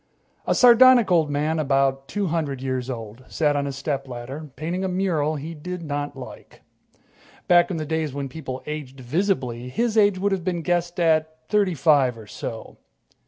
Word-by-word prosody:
A - - +2
sardonic 245 -3 +7
old 160 -4 +3
man, 150 +3 0
about 135 -2 +1
two 200 +8 -2
hundred 155 -6 -2
years 130 -1 -3
old, 115 0 -7
sat 150 -2 +1
on 140 0 -1
a - - -2
stepladder, 135 0 -5
painting 170 +6 -3
a - - 0
mural 175 -5 0
he 155 +3 -6
did 180 +3 -6
not 145 -2 -4
like. 130 - -11 0.8
Back 175 -1 +5
in 180 - -3
the 155 - -3
days 160 -1 -2
when 140 0 -4
people 130 -2 -7
aged 145 -3 -6
visibly, 125 - -1
his 225 - +1
age 205 -2 +4
would 200 +2 0
have 190 -3 -1
been 175 -2 -2
guessed 175 +1 -1
at 160 -1 +2
thirty 200 -4 +2
five 135 -4 +3
or 110 - -11
so. - - -8
155 Hz, 175 wpm, -23 LUFS, 135-175 Hz, 0.8 s, sardonic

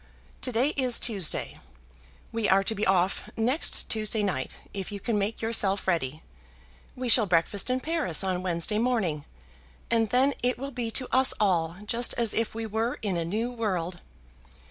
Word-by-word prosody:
To 255 - -1
day 245 +5 +2
is 255 -5 +1
Tuesday. 200 -9 0 0.7
We 225 -2 0
are 195 +1 +5
to 220 - -1
be 215 0 -1
off 190 +2 +1
next 250 +8 0
Tuesday 215 -1 0
night, 160 -10 -2 0.2
if 195 0 -5
you 200 - -5
can 230 +2 -1
make 210 +3 -2
yourself 205 -4 +1
ready. 155 -4 -1 0.7
We 255 0 -4
shall 230 -2 +6
breakfast 180 +5 +1
in 255 +1 0
Paris 310 - 0
on 185 -1 -1
Wednesday 185 +4 0
morning, 215 -12 0 0.7
and 225 -2 +3
then 265 +4 +3
it 250 +1 +1
will 275 +2 -5
be 240 -3 -3
to 255 +3 -1
us 260 0 +4
all 170 -5 +1
just 235 +3 0
as 235 -3 +2
if 225 -1 -1
we 225 0 -3
were 220 +3 -1
in 200 -4 0
a 170 - 0
new 220 +8 -2
world. 185 -7 -2
215 Hz, 175 wpm, -27 LUFS, 185-240 Hz, 0.7 s, shall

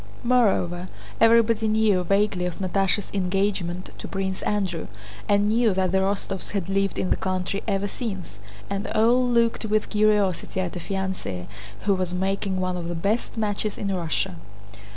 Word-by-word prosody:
Moreover, 195 -8 +2 0.3
everybody 225 -1 +5
knew 215 -4 +3
vaguely 195 -1 +1
of 175 - -5
Natásha's 195 +1 0
engagement 185 -2 -1
to - - -6
Prince 190 -1 -3
Andrew, 190 -6 -1 0.4
and 205 0 +4
knew 220 -2 +3
that 185 -1 +1
the 190 - +3
Rostóvs 195 0 -2
had 195 -2 -2
lived 195 0 0
in 185 - -1
the - - +5
country 185 +1 -2
ever 200 -1 0
since, 195 - -6 0.3
and 200 +2 -3
all 235 +4 +3
looked 235 -2 +2
with 215 0 0
curiosity 210 -4 +2
at 185 -1 -2
a - - -3
fiancée 190 - -3 0.4
who 200 - +2
was 185 -1 -1
making 190 0 -1
one 185 0 -1
of 170 -1 -4
the 175 - -3
best 205 +8 -1
matches 210 -1 -1
in 200 -1 -1
Russia. 165 - -2
195 Hz, 160 wpm, -25 LUFS, 185-210 Hz, 0.4 s, everybody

